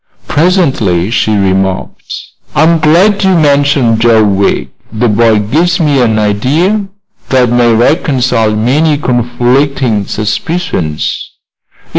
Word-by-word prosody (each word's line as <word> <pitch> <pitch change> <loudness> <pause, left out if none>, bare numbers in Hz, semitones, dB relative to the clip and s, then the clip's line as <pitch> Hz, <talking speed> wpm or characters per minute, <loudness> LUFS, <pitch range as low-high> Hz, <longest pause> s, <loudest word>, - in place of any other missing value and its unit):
Presently 135 - 0
she 110 -2 0
remarked: 95 -1 -2 0.4
"I'm 165 +2 +3
glad 185 +7 +2
you 190 -2 +2
mentioned 140 -6 +1
Joe 115 -2 +3
Wegg. 100 -1 -1 0.2
The 115 +3 -1
boy 110 0 +2
gives 160 - 0
me 145 -5 +1
an 110 -3 +1
idea 145 - 0 0.4
that 125 -2 +2
may 120 -1 +2
reconcile 120 -3 +1
many 145 +8 +1
conflicting 125 -2 -1
suspicions." 105 - -3
125 Hz, 105 wpm, -10 LUFS, 110-155 Hz, 0.4 s, I'm